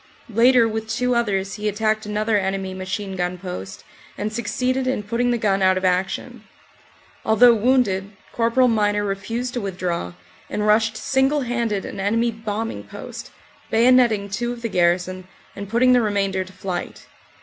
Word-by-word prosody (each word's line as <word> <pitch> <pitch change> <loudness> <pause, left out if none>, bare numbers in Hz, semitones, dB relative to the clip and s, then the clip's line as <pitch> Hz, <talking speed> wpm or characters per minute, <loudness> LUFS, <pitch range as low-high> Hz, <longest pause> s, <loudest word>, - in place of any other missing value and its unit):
Later, 240 +1 +5
with 220 0 -4
two 250 +3 0
others, 195 -5 0
he 210 0 -1
attacked 215 +1 -1
another 210 +1 0
enemy 190 -1 -1
machine 190 +1 -4
gun 180 0 -2
post 175 - -7 0.3
and 215 +1 -3
suc 235 0 -4
ceeded 255 +2 0
in 255 -5 -1
putting 235 +4 0
the 240 - +1
gun 200 -3 +1
out 185 0 +4
of 185 - -1
action. 185 +1 -1 0.8
Although 235 +2 +6
wounded, 215 -4 +1 0.3
Cpl. 235 +2 +3
Miner 205 -3 +1
refused 225 +5 -3
to 245 - -2
withdraw, 180 - -3 0.4
and 210 - -2
rushed 215 +1 +3
single 270 +5 +1
handed 235 -5 -1
an - - -7
enemy 230 +4 +1
bombing 220 - -4
post, 100 - -9 0.4
bayonetting 230 -4 +4
two 240 +4 -2
of 240 -1 -8
the 230 - -1
garrison 180 0 0 0.3
and 200 -1 -7
put 235 +3 0
ting 255 0 +6
the 245 - +5
remainder 195 -3 0
to 185 - -14
flight. 185 -2 -5
210 Hz, 165 wpm, -22 LUFS, 195-235 Hz, 0.8 s, Although